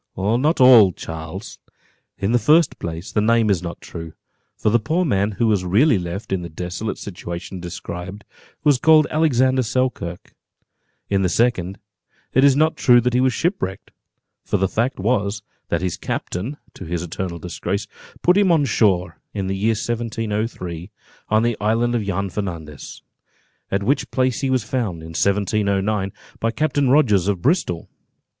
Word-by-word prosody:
"Not 120 - +1
all, 120 -8 +8
Charles. 80 +6 -8 0.6
In 100 +3 -1
the 120 - +4
first 155 +4 +3
place, 85 +2 -6
the 105 - +1
name 115 -1 +3
is 90 -4 +1
not 85 -1 -7
true; 80 -2 -8 0.4
for 105 - +1
the 120 - +4
poor 160 +10 0
man 100 - +1
who 110 +4 0
was 105 -4 +2
really 105 - +3
left 90 +3 -5
in 95 - 0
the 85 - -6
desolate 90 +6 -4
situation 90 -1 -7
described, 90 +3 -7 0.4
was 145 -4 +4
called 155 0 +6
Alexander 130 -4 +3
Selkirk; 115 -8 -2 0.7
in 100 -1 +1
the 95 - +2
second, 100 -5 +1 0.6
it 130 - +4
is 140 -1 +6
not 155 +2 +2
true 120 -1 +6
that 125 +1 0
he 125 - +3
was 130 0 +3
shipwrecked, 120 - -2 0.5
for - - 0
the 95 0 +1
fact 120 +6 -1
was, 105 -1 0 0.3
that 85 +1 -1
his 90 -3 -2
captain, 110 +12 -4 0.2
to - - -10
his 85 +1 -3
eternal 90 0 -4
disgrace, 90 +4 -3 0.4
put 180 - +5
him 200 -3 +4
on 155 -4 +3
shore, 90 - +1 0.2
in 100 -2 -2
the 95 +1 -2
year 110 +4 +1
1703, 110 -6 -3 0.4
on 110 +1 +3
the 120 -1 +1
island 115 +3 +1
of 120 -3 0
Juan 100 0 -2
Fernandez, 85 -8 -6 0.7
at 100 +1 -1
which 140 +8 0
place 130 -2 0
he 135 - 0
was 130 -3 +1
found, 105 -8 -3
in 80 - -9
1709, 100 +2 0 0.3
by 115 - 0
Captain 145 +1 0
Rogers 110 - +4
of 95 -4 -1
Bristol. 135 - 0
105 Hz, 165 wpm, -21 LUFS, 90-125 Hz, 0.7 s, all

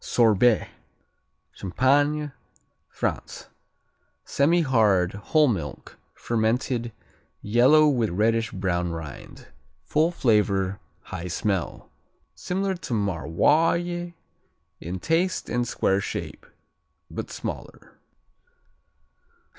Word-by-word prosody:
Sorbais 115 -1 +3 0.8
Champagne, 145 - +1 0.6
France - - -4 0.8
Semihard; 125 - +2
whole 150 +10 +2
milk; 80 - -4 0.2
fermented; 120 +1 -1 0.5
yellow, 130 +8 +5
with 120 -7 +1
reddish 110 +4 +1
brown 90 -2 -1
rind. 80 -3 -9 0.3
Full 155 - +2
flavor, 100 - +1 0.2
high 85 - -6
smell. 95 0 -3 0.4
Similar 190 +1 -2
to 125 - -4
Maroilles 155 - +1 0.7
in 90 +3 -5
taste 165 - 0
and 120 0 0
square 95 -2 +1
shape, - - -6 0.6
but - - -5
smaller. - - -8
115 Hz, 80 wpm, -25 LUFS, 95-150 Hz, 0.8 s, yellow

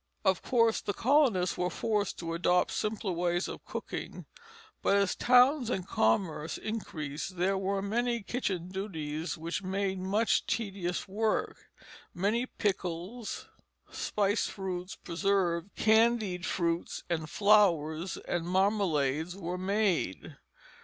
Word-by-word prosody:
Of 190 -2 +3
course 230 -3 +2
the 205 - -3
colonists 240 - +3
were 180 - +1
forced 210 0 -1
to 165 -1 -4
adopt 180 +1 +2
simpler 215 -2 -2
ways 175 +1 0
of - - -7
cooking, - - -6 0.6
but 200 - +3
as 200 -2 +2
towns 250 +1 +5
and 190 -6 -2
commerce 150 - +1
increased 175 -6 -5
there 190 +3 +2
were 195 +1 -1
many 235 +2 0
kitchen 190 -6 -2
duties 165 -5 -4
which 165 +4 -3
made 190 0 -1
much 205 +5 +1
tedious 195 -5 -2
work. 215 +3 -1 0.5
Many 215 +7 +1
pickles, 195 +2 -3 0.4
spiced 205 +1 0
fruits, 185 -2 -5
preserves, 180 -1 0
candied 220 -4 +3
fruits 170 -1 -1
and 160 -3 -2
flowers, 180 -5 +3
and 175 -1 -1
marmalades 180 -5 +1
were 180 -1 -4
made. 190 - 0
190 Hz, 120 wpm, -30 LUFS, 175-210 Hz, 0.6 s, towns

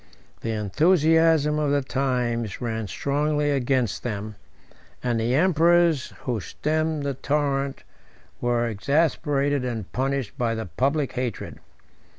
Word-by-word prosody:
The 115 - -4
enthusiasm 155 - +3
of 150 -1 +1
the 140 -1 +1
times 125 -5 -1
ran 110 -3 -3
strongly 145 +5 0
against 130 -6 0
them; 105 -2 -4 0.7
and 120 -2 0
the 120 +3 +1
emperors 170 -2 +3
who 120 -4 -2
stemmed 155 +6 -2
the 140 -1 -1
torrent 140 0 -1 0.6
were 120 -1 +1
exasperated 140 - +1
and 115 -6 -4
punished 135 -3 -2
by 115 -2 +1
the 110 - -4
public 135 - 0
hatred. 125 -4 -4
135 Hz, 120 wpm, -24 LUFS, 120-150 Hz, 0.7 s, enthusiasm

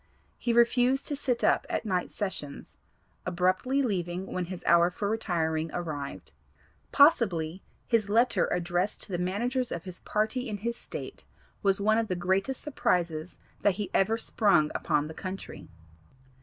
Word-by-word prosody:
He 240 - 0
refused 245 +3 +3
to 290 - -1
sit 255 -4 -1
up - - +3
at - - -2
night 185 -4 -1
sessions, 190 -8 -5 0.5
abruptly 185 +10 +1
leaving 185 -4 -2
when 180 -1 -1
his 180 0 -7
hour 170 0 +5
for 200 +3 -3
retiring 165 -7 -1
arrived. 145 - -5 0.6
Possibly 190 - +4 0.2
his 225 -4 +1
letter 235 +4 +3
addressed 175 +2 -1
to 205 - -7
the 175 - -1
managers 240 +8 -1
of 170 - -4
his 185 -2 -8
party 220 +4 -1
in 210 - -3
his 235 +4 -3
State - - -8 0.4
was 195 -1 +3
one 215 +2 +3
of 225 - -1
the 185 - -1
greatest 190 +8 -1
surprises 180 - -1 0.2
that 200 -3 +3
he 205 0 -4
ever 215 +4 +3
sprung 195 -9 +3
upon 150 -2 0
the 160 - -8
country. 190 +3 -7
195 Hz, 155 wpm, -28 LUFS, 175-230 Hz, 0.6 s, hour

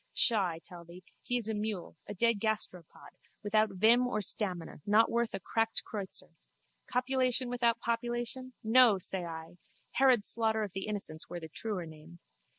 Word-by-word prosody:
Pshaw, 215 -6 +3
I 165 -2 -5
tell 170 +1 -11
thee! 175 +2 -13 0.2
He 245 - -1
is 230 -3 +3
a 220 - -1
mule, 210 -6 -4
a 205 - -6
dead 230 +2 +2
gasteropod, 200 -6 -4 0.3
without 215 +1 +2
vim 225 +6 +4
or 245 - -1
stamina, 185 -6 0
not 215 +2 +3
worth 235 -3 0
a - - -4
cracked 225 +4 0
kreutzer. 200 -3 -6 0.6
Copulation 255 0 +1
without 240 -1 +1
population! 240 +2 -3
No, 225 -1 +6
say 185 0 -2
I! 165 +1 -9 0.3
Herod's 255 -6 +4
slaughter 220 -1 +2
of 205 - -5
the 195 +2 -5
innocents 195 -7 -4
were 175 - -5
the 160 -1 -9
truer 195 0 -4
name. 160 +2 -13
215 Hz, 165 wpm, -31 LUFS, 180-235 Hz, 0.6 s, No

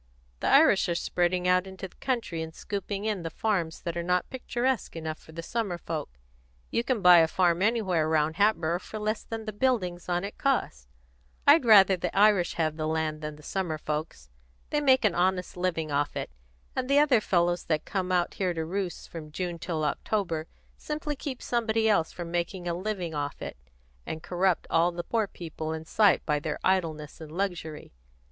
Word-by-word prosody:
The - - -2
Irish - - +5
are 170 - 0
spreading 180 +1 0
out 180 +1 +3
into 190 0 -7
the - - -25
country 235 -11 -2
and 160 0 -6
scooping 200 0 -4
in 210 -4 -1
the 165 - -4
farms 175 -3 -1
that 170 -1 -3
are 170 - -1
not 180 +1 0
picturesque 255 -3 -1
enough 160 -1 -4
for - - -16
the 165 +1 -7
summer 205 -3 -2
folks. 155 - -5 0.5
You 230 - +1
can 240 -4 -1
buy 180 -1 +9
a 160 - +5
farm 175 0 +2
anywhere 190 -8 +2
round 155 0 +1
Hatboro' 175 -5 +2
for 215 - -8
less 215 +1 -1
than 225 -1 -6
the 215 - -4
buildings 190 -8 0
on 175 +1 0
it 200 - -7
cost. 155 - 0 0.6
I'd 290 -1 +6
rather 195 -4 +7
the 180 - -4
Irish 200 -4 +4
would 165 - +1
have 155 0 -1
the 155 -1 -2
land 155 -1 -1
than 150 0 -5
the 150 - -16
summer 175 -2 -2
folks. 150 - -5 0.4
They 295 - +1
make 260 -4 +4
an 210 - +3
honest 180 0 0
living 170 -4 -1
off 145 +1 0
it, - - -4 0.4
and 255 0 -2
the 280 - +4
other 285 -6 +5
fellows 175 -2 +1
that 155 -2 0
come 185 -2 -2
out 175 -1 +2
to 190 - -2 0.2
roost 185 +1 -3
here - - -19
from 155 -2 -8
June 175 +1 -4
till 160 -3 -2
October 165 0 -1 0.3
simply 300 0 -4
keep 265 -2 -6
somebody 225 -2 +1
else 165 -7 +2
from 170 -1 -7
making 175 +1 -2
a 170 - 0
living 180 -2 -3
off 145 -1 -3
it, - - -6 0.5
and 160 0 -5
corrupt 180 0 +1
all 170 +2 +4
the 175 0 -5
poor 220 +2 0
people 160 -3 -6
in 160 0 -6
sight 205 +2 +3
by 150 -1 +1
their 150 0 -3
idleness 165 -5 0
and 155 -1 -9
luxury. 170 - -4
180 Hz, 200 wpm, -28 LUFS, 160-210 Hz, 0.6 s, buy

